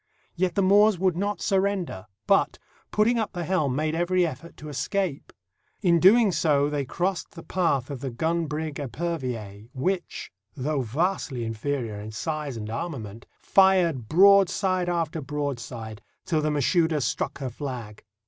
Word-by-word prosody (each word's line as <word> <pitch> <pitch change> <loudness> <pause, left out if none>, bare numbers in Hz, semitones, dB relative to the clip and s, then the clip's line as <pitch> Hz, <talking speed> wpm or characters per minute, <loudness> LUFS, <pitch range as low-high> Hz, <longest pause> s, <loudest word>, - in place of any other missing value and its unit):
Yet 180 0 0
the 200 - +2
Moors 205 +1 +5
would 185 -1 +1
not 205 +3 -2
surrender, 195 - 0 0.2
but, - - +3 0.3
putting 230 +3 +2
up 220 - -2
the 175 -2 -3
helm, 155 -7 0
made 155 +2 0
every 175 +2 +2
effort 165 +2 -7
to 150 - -9
escape. 150 +3 -2 0.5
In 170 -3 +4
doing 210 +4 +6
so 145 -4 +2
they 145 -2 -1
crossed 185 +7 -2
the 165 - -9
path 145 -8 0
of 135 -3 -6
the 135 - -3
gun 160 +7 -1
brig 150 0 -4
Epervier, 125 -8 -4
which, 180 +8 -2 0.2
though 145 +1 -1
vastly 135 - -1
inferior 115 -1 -3
in 110 +1 -7
size 150 +2 -4
and 105 -1 -5
armament, 115 -6 -6 0.2
fired 175 - +3
broadside 190 0 +4
after 165 -2 -1
broadside 130 -6 -5 0.2
till 160 -3 +1
the 155 - 0
Mashouda 155 +2 +2
struck 135 - -2
her 130 -3 -4
flag. 120 -6 -7
155 Hz, 150 wpm, -26 LUFS, 130-185 Hz, 0.5 s, doing